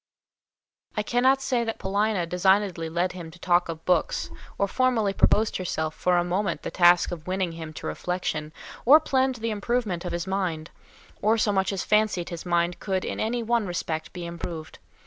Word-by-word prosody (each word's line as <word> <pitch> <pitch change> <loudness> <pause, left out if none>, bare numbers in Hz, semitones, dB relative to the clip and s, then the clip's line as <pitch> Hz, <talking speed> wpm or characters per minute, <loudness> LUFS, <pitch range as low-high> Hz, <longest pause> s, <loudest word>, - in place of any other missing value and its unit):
I 210 - +1
cannot 260 +4 +2
say 250 -3 +1
that 225 -1 -3
Paulina 200 -1 0
designedly 180 -1 +1
led 175 +3 0
him 175 -3 -8
to 160 - -14
talk 175 -1 +2
of 165 0 -6
books, 180 -3 +1 0.3
or 200 - +1
formally 230 -3 +1
proposed 215 +2 +3
to - - -3
herself 160 -3 -2
for 180 +2 +1
a 175 - +3
moment 180 +1 -1
the - - -4
task 175 -1 +5
of 170 -1 -7
winning 185 -1 -1
him 165 -1 -7
to - - -8
reflection, 160 -4 -3 0.3
or 290 +6 +8
planned 265 -3 +1
the 230 -1 -3
improvement 210 -4 -1
of 180 - -4
his 170 0 -2
mind, 185 -5 -2 0.5
or 220 +2 +3
so 215 -1 +2
much 190 0 +1
as 195 -2 -2
fancied 210 -5 +1
his 170 +1 -7
mind 175 0 +1
could 190 -2 -2
in - - -4
any 235 +2 -1
one 230 -2 +1
respect 160 -2 -3
be 175 -2 -6
improved. 170 -2 -7
185 Hz, 190 wpm, -26 LUFS, 170-215 Hz, 0.5 s, or